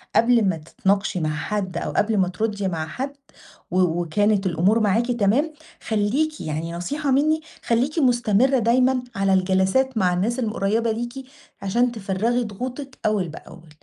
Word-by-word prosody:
قبل 230 -2 +4
ما 165 - -1
تتناقشي 190 +4 -1
مع 155 - -1
حد 190 +2 -3
أو - - -3
قبل 215 0 +1
ما 190 -2 +3
تردي 205 +1 -2
مع 160 -3 -3
حد، 265 - -5 0.6
و 185 - +1 0.2
وكانت 205 +4 +1
الأمور 185 +6 +2
معاكِ 225 +3 +1
تمام، 240 +8 +1 0.3
خليكِ 250 +9 0
يعني 160 +2 -4
نصيحة 275 - -2
مِنّي، 310 +4 +2 0.2
خليكِ 260 +8 +1
مستمرة 245 0 +3
دايمًا 250 +3 +2
على 195 -1 +2
الجلسات 190 +7 +2
مع 180 -3 +2
الناس 220 +8 0
القريّبة 225 0 0
ليكِ 240 +4 -5 0.4
عشان 235 +6 +1
تفرّغي 225 +3 -1
ضغوطِك 255 +6 -6
أول 205 -5 +1
بأول. 165 +1 -12
215 Hz, 150 wpm, -23 LUFS, 190-250 Hz, 0.6 s, قبل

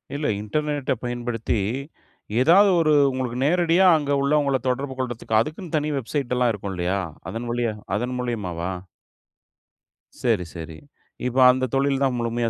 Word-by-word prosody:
இல்ல 145 +1 -1
இன்டர்நெட்ட 145 +5 -2
பயன்படுத்தி, 120 -2 -2 0.8
ஏதாவது 190 +8 +6
ஒரு 155 -1 +3 0.2
உங்களுக்கு 125 -2 -3
நேரடியா 175 +3 +3
அங்க 145 -1 -3
உள்ளவங்கள 140 -2 +2
தொடர்பு 135 +1 -2
கொள்றதுக்கு, 120 -3 0
அதுக்குன்னு 155 - -3
தனி 150 0 -1
வெப்சைட் 130 0 -2
எல்லாம் 125 -2 +3
இருக்கும், 100 -2 -5
இல்லயா? 90 +3 -1 0.3
அதன் 115 +2 -5
வழியா 120 -2 -1 0.2
அதன் 125 +3 -3
மூலியமாவா? 95 -8 -3 1.5
செரி, 110 -8 +1
செரி. 80 -1 -7 0.5
இப்ப 125 +1 -4
அந்த 130 -1 -1
தொழில் 135 0 +1
தான் 130 -2 +1
முழுமையா 115 0 -1
125 Hz, 135 wpm, -23 LUFS, 115-145 Hz, 1.5 s, ஏதாவது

